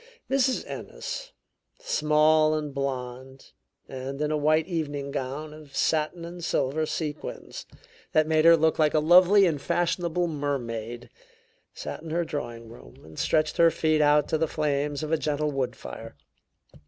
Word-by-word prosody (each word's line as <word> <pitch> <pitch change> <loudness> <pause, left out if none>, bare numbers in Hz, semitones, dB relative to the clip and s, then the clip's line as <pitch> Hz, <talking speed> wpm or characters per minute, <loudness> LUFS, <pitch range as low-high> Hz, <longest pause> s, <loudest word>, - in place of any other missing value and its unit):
Mrs. 265 -1 +2
Ennis, - - -6 0.5
small 155 - +3
and 150 -2 -4
blond, 130 -1 -5 0.4
and 135 +1 -6
in 150 0 0
a - - +1
white 155 +1 +2
evening 145 -5 -3
gown 140 +4 -4
of 150 -2 -13
satin 160 +2 0
and 175 0 -9
silver 155 0 0
sequins 155 -2 -5 0.4
that 155 0 +3
made 155 0 +2
her 165 0 +8
look 160 0 +1
like 155 -1 +3
a - - +5
lovely 180 +5 +6
and 155 -5 0
fashionable 175 +1 0
mermaid, 120 -7 -4 0.6
sat - - -6
in 160 - -9
her 170 +2 0
drawing 120 -7 -5
room - - -15
and 80 0 -11
stretched 155 -1 +1
her 170 0 +6
feet 155 -1 +1
out 150 0 +4
to 160 - 0
the 160 - +1
flames 145 -1 -1
of 155 - -4
a 160 - +3
gentle 150 0 -1
woodfire. 125 - -5
150 Hz, 155 wpm, -26 LUFS, 140-160 Hz, 0.6 s, her